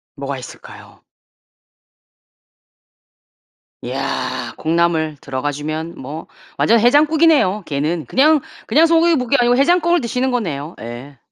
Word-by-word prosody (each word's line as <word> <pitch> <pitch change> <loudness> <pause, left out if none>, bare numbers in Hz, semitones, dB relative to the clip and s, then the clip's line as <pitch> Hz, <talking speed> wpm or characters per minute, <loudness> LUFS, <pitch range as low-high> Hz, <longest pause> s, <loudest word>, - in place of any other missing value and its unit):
뭐가 - - -5
있을까요? - - -13 2.8
이야 - - -4
콩나물 160 -1 0
들어가 135 +1 -3
주면 155 +3 -5
뭐 145 +5 -8 0.3
완전 230 +1 +3
해장국이네요 295 - +3
걔는. 150 +3 -2
그냥, 300 +4 +3 0.3
그냥 320 +3 +4
소고기뭇국이 325 -6 +2
아니고 245 0 +3
해장국을 345 +4 +3
드시는 250 +2 -1
거네요. 165 - -3
예. 120 +4 -9
210 Hz, 270 characters per minute, -18 LUFS, -, 2.8 s, 그냥